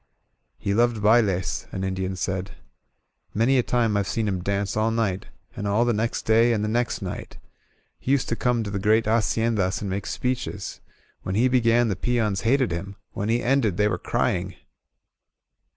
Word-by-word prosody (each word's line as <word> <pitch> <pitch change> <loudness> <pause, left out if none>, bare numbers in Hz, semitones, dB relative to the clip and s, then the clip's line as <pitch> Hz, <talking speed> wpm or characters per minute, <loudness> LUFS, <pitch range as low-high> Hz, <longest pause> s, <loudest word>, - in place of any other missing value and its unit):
" - - -49
"He 100 - -2
loved 120 +1 +2
baUei, 105 -4 +1
an 95 - -4
Indian 95 0 -2
said. 95 +1 -3 0.8
"Many 125 +5 +3
a - - +5
time 115 -3 +1
I've 100 -2 0
seen 110 +4 -1
him 95 -3 -1
dance 100 +1 -1
all 110 +1 +2
night, 110 -5 -1 0.3
and 100 - -4
all 105 +4 +2
the 120 - +2
next 110 +2 -1
day, 115 +2 +4
and 105 -2 -1
the - - 0
next 120 +2 -1
night. - - -6 0.6
He 130 - -2
used 140 -2 +2
to 115 - 0
come 120 -1 0
to 100 - -5
the 100 - -2
great 110 +3 +3
Hacien 115 +1 +1
das 95 -1 0
and 100 -2 -3
make 100 +1 -3
speeches. 125 -6 -3 0.4
When 95 - -3
he 120 +5 +4
began 120 -1 +3
the 100 - 0
peons 110 -2 0
hated 125 +2 +2
him; 95 +4 -5 0.2
when 100 +2 -3
he 120 +2 +1
ended 120 -8 +2
they 105 - +3
were 90 -4 -1
crying. - - -1
110 Hz, 190 wpm, -24 LUFS, 100-120 Hz, 0.8 s, a